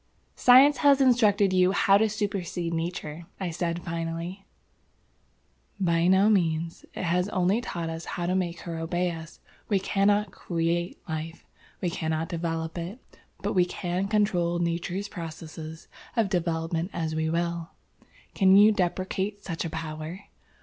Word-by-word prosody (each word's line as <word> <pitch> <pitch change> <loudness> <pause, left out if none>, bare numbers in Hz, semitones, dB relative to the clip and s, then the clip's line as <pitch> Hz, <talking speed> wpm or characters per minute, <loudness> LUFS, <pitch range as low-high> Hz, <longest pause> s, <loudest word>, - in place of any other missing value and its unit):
"Science 265 +4 +7
has 285 -2 +5
instructed 215 -7 +4
you 185 0 +4
how 195 0 +4
to 220 +2 +4
supercede 195 -5 -2
Nature," 165 -1 -4
I 185 -3 -2
said, 170 0 -2
finally. 170 +3 -4 1.3
"By 170 -2 +2
no 190 +2 +5
means. 165 -5 +1
It - - -4
has 180 +3 +1
only 190 +3 +1
taught 170 -7 -4
us 165 +1 -6
how 175 - -2
to 180 - 0
make 175 -3 -1
her 165 -2 -5
obey 175 +2 -1
us. 165 0 -9 0.3
We 205 - +3
cannot 200 +1 +2
create 170 0 -2
Life. 160 +1 -5 0.4
We 180 -3 0
cannot 160 -1 -2
develop 165 -1 -3
it. 185 +9 -9 0.2
But - - -1
we 180 - +4
can 180 +1 -2
control 195 -5 +1
Nature's 175 +3 -2
processes 160 -2 -8 0.3
of 220 -4 +2
development 165 -1 -1
as 160 -2 -2
we 160 0 0
will. 170 0 -1 0.6
Can 190 -1 +5
you 210 +2 +8
deprecate 190 +1 -2
such 165 -3 -3
a - - -2
power? 160 +2 -6
175 Hz, 145 wpm, -27 LUFS, 165-195 Hz, 1.3 s, you